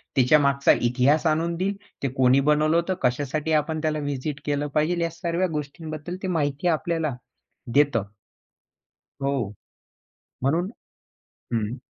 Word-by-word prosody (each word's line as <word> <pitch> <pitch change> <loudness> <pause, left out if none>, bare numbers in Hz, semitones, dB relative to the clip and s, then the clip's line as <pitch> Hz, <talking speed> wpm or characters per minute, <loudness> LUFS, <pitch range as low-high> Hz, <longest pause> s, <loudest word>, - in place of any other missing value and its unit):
त्याच्या 130 +3 +5
मागचा 140 -1 +3
इतिहास 130 +6 +3
आणून 165 +2 +1
देईल, 195 +3 -1 0.3
ते - - +2
कोणी 130 +1 +5
बनवलं 155 +1 +3
होतं, 170 +2 +1
कशासाठी 145 +5 0
आपण 155 +1 -3
त्याला 155 -1 0
व्हिजिट 145 0 -3
केलं 145 0 0
पाहिजे 170 +3 +2
या 165 - 0
सर्व्या 170 +2 -1
गोष्टींबद्दल 155 +2 -5
ते - - -1
माहिती 150 -1 0
आपल्याला 160 -3 0 0.6
देतं 140 -8 +3 1.2
हो. 135 -7 -1 0.9
म्हणून 165 +8 +1 0.8
हं. 115 +2 -1
150 Hz, 125 wpm, -25 LUFS, 140-165 Hz, 1.2 s, त्याच्या